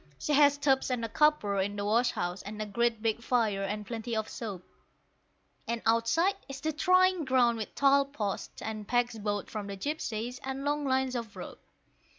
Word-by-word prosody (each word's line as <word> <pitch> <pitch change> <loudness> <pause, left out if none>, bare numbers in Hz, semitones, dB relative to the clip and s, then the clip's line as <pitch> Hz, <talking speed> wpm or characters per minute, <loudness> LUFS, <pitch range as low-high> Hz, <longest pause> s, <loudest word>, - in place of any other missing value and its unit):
She 300 - -2
has 285 0 +5
tubs 270 -2 +2
and 245 -3 -1
a - - -5
copper 260 -9 +2
in 200 +2 -1
the 200 0 -3
wash 235 +4 +3
house, 175 +2 -3
and 210 +1 -8
a 215 - -2
great 230 +2 0
big 225 0 0
fire 225 -5 +1
and 210 +2 -3
plenty 230 +1 -4
of 220 -1 -1
soap; 200 -6 -6 1.0
And 235 0 -2
outside 230 - +3 0.2
is 275 0 -6
the 315 0 -2
drying 370 +1 +3
ground 250 -4 +3
with 215 - -6
tall 280 0 +4
posts, 215 -8 -5
and 215 -2 -5
pegs 245 -2 0
bought 205 -1 -2
from 210 -2 -5
the 200 - -5
gipsies, 245 -2 -3
and 270 +1 -4
long 295 0 0
lines 265 -1 +1
of 230 -4 -5
rope. - - -9
235 Hz, 190 wpm, -30 LUFS, 215-275 Hz, 1.0 s, has